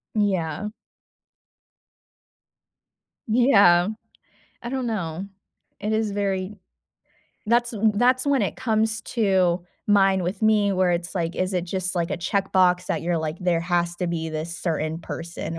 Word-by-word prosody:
Yeah. 195 -3 0 2.6
Yeah. 200 -7 +5 0.7
I 240 - -5
don't 260 -1 -2
know. 185 -5 -3 0.5
It 210 +2 -2
is 220 -1 0
very 200 0 -2 0.9
that's 240 +2 +2
w 220 0 +2
that's 255 +4 +3
when 280 -2 +3
it - - -2
comes 220 -1 0
to 190 -6 +1 0.3
mind 195 -2 +4
with 185 +3 -3
me, 210 -2 +3
where 185 -1 +2
it's 175 +1 -2
like, 170 -2 -2
is 185 +1 -1
it 180 -2 -1
just 185 +1 -2
like 170 -2 -1
a - - -1
checkbox 185 0 +1
that - - -2
you're 170 0 0
like, 160 0 -3
"There 175 -2 +1
has 175 0 0
to 180 - -2
be 165 -1 -3
this 160 +2 -4
certain 160 -1 -2
person 165 0 -6
185 Hz, 140 wpm, -24 LUFS, 170-215 Hz, 2.6 s, Yeah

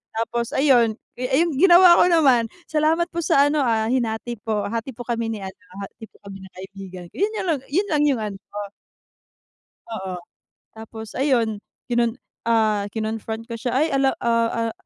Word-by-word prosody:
tapos 230 +1 -2
ayun, 245 -6 +4 0.2
ay 265 +5 +2
yung 320 -5 -3
ginawa 355 -1 +7
ko - - +7
naman, 265 -9 +4 0.2
"Salamat 315 +2 +2
po 340 - -3
sa 285 -2 +4
ano, 305 - +1
ah, 225 -2 +1
hinati 235 -1 -2
po, 215 -2 -2
hati 230 +4 -4
po 245 - -7
kami 230 -1 -1
ni 215 - -4
ano, 190 0 -8 0.2
hati 225 +3 -10
po - - -37
kami 195 -1 -9
ng 190 -1 -13
kaibigan 190 -1 -9
ko," - - -25
yun, 420 +2 +1 0.4
yun 395 +6 +1
lang 295 -1 +2
yung 255 -6 +1
ano. 200 -2 -5 1.5
Oo, 190 -5 -5 0.6
tapos 220 0 -9
ayun 235 -6 +1 0.3
kinon 235 -1 0 0.3
ah, 215 -3 +2
kinon-front 220 0 -4
ko 230 - -5
siya, 245 0 -2
"Ay 300 +5 +3
alam 270 -1 +2
ah, 230 -1 +1
ah, - - -5
230 Hz, 170 wpm, -22 LUFS, 220-275 Hz, 1.5 s, ginawa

